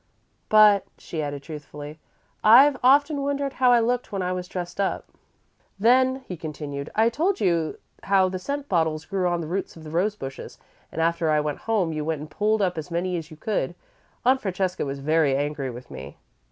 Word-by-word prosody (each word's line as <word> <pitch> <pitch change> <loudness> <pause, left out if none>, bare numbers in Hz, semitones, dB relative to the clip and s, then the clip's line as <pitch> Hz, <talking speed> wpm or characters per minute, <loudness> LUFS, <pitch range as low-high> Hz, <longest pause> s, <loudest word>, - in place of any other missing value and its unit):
"But," 210 -2 +6
she 160 - -5
added, 145 -1 -4
truthfully, 150 0 -9 0.4
"I've 265 +6 +7
often 285 +3 +4
wondered 280 0 -1
how 250 -1 +6
I 240 - +6
looked 245 +2 -1
when 195 -2 -2
I 180 0 -1
was 180 0 -4
dressed 180 +1 -4
up." 195 - -1 0.7
"Then," 260 +5 +3
he 180 - -5
continued, 145 -2 -6
"I 220 +1 +4
told 330 +12 0
you 170 -6 0 0.2
how 195 -1 +3
the 185 0 -4
scent 285 +7 -4
bottles 160 -3 0
grew 190 -2 -1
on 175 -1 0
the 160 - -5
roots 185 +1 -4
of 160 - -12
the 155 - -9
rose 195 +6 +1
bushes, 135 -8 -8 0.3
and, 165 - -3
after 170 -1 +1
I 155 0 +3
went 150 -1 -2
home, 190 -8 +1
you 155 -1 -3
went 160 -1 -2
and 150 0 -9
pulled 210 +3 +1
up 180 -3 0
as 160 - -7
many 180 +2 -1
as 165 -2 -5
you 155 - -12
could. 175 - -2 0.5
Aunt 260 +1 +4
Francesca 185 -4 -2
was 135 0 -4
very 150 0 +2
angry 145 -1 -2
with 125 +1 -10
me." 70 +2 -9
180 Hz, 200 wpm, -24 LUFS, 155-215 Hz, 0.7 s, I've